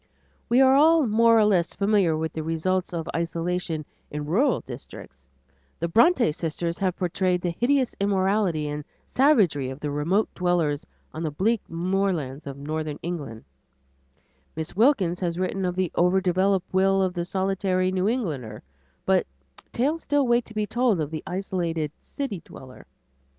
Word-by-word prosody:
We 245 +3 +5
are 265 0 +6
all 315 +2 +5
more 230 +1 +4
or 215 - +5
less 180 -5 +1
familiar 200 -6 +2
with 160 0 -3
the 160 - -3
results 170 +4 -1
of 165 -2 -4
isolation 165 -1 -2 0.2
in 150 0 -5
rural 230 - +2
districts; 120 - -10 0.6
the 170 - -2
Bronte 235 - +4
sisters 170 +1 -3
have 185 -2 0
portrayed 180 0 0
the 175 - -1
hideous 260 +1 +2
immorality 195 -5 +1
and 150 0 -4 0.3
savagery 205 - +3
of 130 +1 -7
the 150 -1 -3
remote 170 +9 +1
dwellers 170 -5 0 0.3
on 155 - -6
the 160 - -1
bleak 205 +9 0
moorlands 170 -5 -1
of 140 0 -6
northern 155 +1 -4
England; 145 -10 -5 1.1
Miss 160 +1 -5
Wilkins 200 -7 +3
has 175 -2 -2
written 185 +1 -1
of 180 0 -1
the 185 -2 -1
overdeveloped 185 +1 +1
will 195 +1 +3
of 185 -1 -1
the 175 -1 -2
solitary 185 0 0
New 185 +2 +1
Englander; 145 - -3 0.4
but - - +2 0.4
tales 295 +7 0
still 290 -1 +1
wait 240 0 +2
to 220 - -13
be 215 0 0
told 235 -3 +1
of 150 -1 -2
the 155 - -4
isolated 170 -4 -2
city 240 -11 -5
dweller. 130 -1 -13
180 Hz, 155 wpm, -25 LUFS, 160-205 Hz, 1.1 s, are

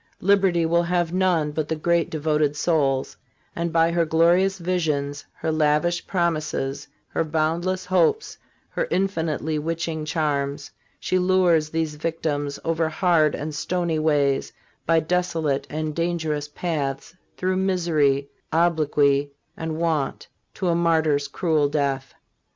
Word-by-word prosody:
Liberty 190 -3 +3
will 170 +1 +3
have 175 -1 0
none 180 -5 +2
but 150 0 -2
the 160 - -1
great 170 +2 +1
devoted 150 -1 0
souls, 145 -4 0 0.4
and 170 0 -2
by 165 0 +3
her 170 0 +2
glorious 170 +4 +3
visions, 155 -6 -1
her 160 - -2
lavish 155 +2 +1
promises, 155 -6 -1 0.2
her - - 0
boundless 165 +4 -1
hopes, 185 - +1 0.3
her - - -2
infinitely 160 -5 -1
witching 165 0 -3
charms, 145 -2 -2 0.3
she 185 - 0
lures 180 -4 +3
these 160 -1 -1
victims 150 -2 -2
over 165 -1 +1
hard 160 -3 +2
and 155 +1 -5
stony 170 +1 -1
ways, 145 -3 +1 0.4
by 165 0 +4
desolate 160 -4 -1
and 155 0 -3
dangerous 160 -3 -1
paths, 145 -2 -3 0.2
through 185 0 0
misery, 160 -7 +1 0.2
obloquy 150 -4 +2 0.2
and 160 -1 -4
want 160 -4 -1 0.3
to 190 - -2
a 170 - +3
martyr's 160 -4 +2
cruel 155 -5 +1
death. 140 -3 -2
160 Hz, 130 wpm, -23 LUFS, 150-175 Hz, 0.4 s, by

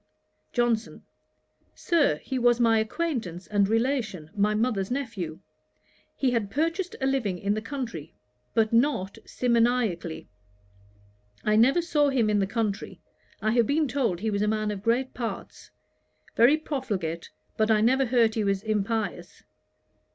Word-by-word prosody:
JOHNSON. 240 -2 0 0.7
'Sir, 315 - +2
he 260 - -3
was 240 0 +3
my 225 -2 +4
acquaintance 220 - -3
and 200 -1 +1
relation, 225 - -1
my 210 +1 +2
mother's 215 -4 0
nephew. 205 - -4 0.7
He 265 -2 +1
had 225 -5 -1
purchased 330 - -1
a 265 - -1
living 250 -9 0
in 200 +3 -1
the 215 - -2
country, 230 - -6 0.4
but 220 0 +2
not 230 -6 +1
simoniacally. 235 -9 0 1.2
I 215 - +2
never 265 +10 +4
saw 295 -4 +2
him 260 -5 +2
but 215 - +1
in 205 - +2
the 195 - +1
country. 215 -1 -3 0.4
I 215 - +2
have 235 -1 +3
been 300 +1 +2
told 235 -9 -1
he 220 0 -1
was 200 0 -1
a 210 - +1
man 215 0 0
of 200 -2 -5
great 240 +4 0
parts; 235 -3 -6 0.7
very 250 +7 +5
profligate, 200 - -4 0.3
but 220 0 +1
I 215 -1 +4
never 260 +4 +3
heard 230 -2 +3
he 220 - -1
was 200 -1 0
impious.' 215 0 -2
225 Hz, 150 wpm, -26 LUFS, 205-255 Hz, 1.2 s, very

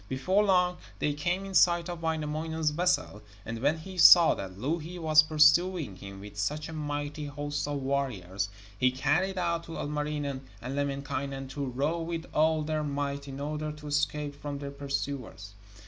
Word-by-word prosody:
Before 185 +11 +2
long 180 -3 +3 0.2
they 150 - 0
came 175 +6 -1
in 195 - -7
sight 175 -1 +4
of 175 -2 -6
Wainamoinen's 160 0 -1
vessel, 170 - 0 0.2
and 115 0 -5
when 145 +6 +2
he 185 +3 -8
saw 170 0 +9
that 95 -1 -7
Louhi 160 - -3
was 155 -2 +6
pursuing 155 - +3
him 95 +1 -10
with 105 0 -9
such 150 +8 -1
a 160 - -8
mighty 145 0 -4
host 145 0 -3
of 145 -2 -3
warriors, 100 -9 -2 0.3
he 130 +5 +3
cried 170 +9 0
out 170 -2 -1
to 165 - -7
Ilmarinen 145 -2 -3 0.2
and 125 +4 -5
Lemminkainen 140 -1 -3
to 140 0 -4
row 145 +7 -1
with 165 0 -4
all 155 0 +3
their 155 0 -1
might, 140 -1 -3
in 135 0 -7
order 150 +1 -3
to 150 0 -12
escape 150 0 -1
from 145 0 -6
their 140 0 -6
pursuers. 140 -7 -5
150 Hz, 170 wpm, -29 LUFS, 140-160 Hz, 0.3 s, saw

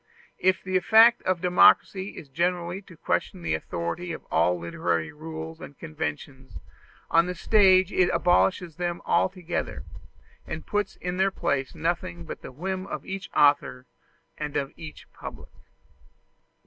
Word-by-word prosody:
If 185 +1 +2
the 185 0 +1
effect 225 +4 +6
of 185 -2 +1
democracy 185 +2 +4
is 150 - -9
generally 175 +5 -1
to 180 -4 -16
question 180 +2 -2
the - - 0
authority 85 - -3
of - - -9
all 85 +2 +3
literary 85 -1 -2
rules 160 +1 -8
and 145 -6 -10
conventions, 145 - -6 0.5
on 165 +1 +4
the 180 - -3
stage 190 0 +4
it 180 -1 +3
abolishes 175 -2 +2
them 175 -1 -3
altogether, 180 -1 -1 0.6
and 155 - -6
puts 205 -1 -2
in 180 0 -4
their 190 +1 +3
place 140 -7 -2
nothing 160 - -2
but - - -7
the - - -9
whim 185 +7 -4
of - - -6
each 195 0 -6
author 145 -3 +3 0.5
and 150 -1 -3
of 140 -1 -3
each 155 -2 -10
public. - - -10
170 Hz, 145 wpm, -26 LUFS, 150-185 Hz, 0.6 s, effect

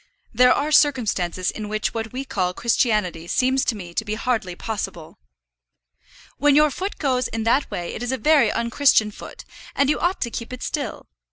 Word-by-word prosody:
"There 250 +2 +5
are 295 +3 +1
circumstances 215 - +2
in 210 -1 -7
which 215 0 -2
what 225 -1 -4
we 265 +2 -5
call 180 -7 -2
Christianity 210 -8 0
seems 260 +6 +1
to 235 - 0
me 175 -4 -9
to 220 - -1
be 215 0 -3
hardly 220 -6 -2
possible." 175 - -6 1.2
"When 290 0 +4
your 300 0 +5
foot 385 +8 -4
goes 255 -4 0
in 225 0 -4
that 240 +6 +2
way 175 -1 -5
it - - -6
is 245 +1 -2
a 260 - -1
very 295 -6 +4
unchristian 235 -2 +2
foot, - - -11 0.3
and 280 +1 +3
you - - -1
ought 355 +2 0
to 235 - -2
keep 230 +1 -6
it 255 - -7
still. 295 -3 -4
235 Hz, 190 wpm, -22 LUFS, 210-270 Hz, 1.2 s, There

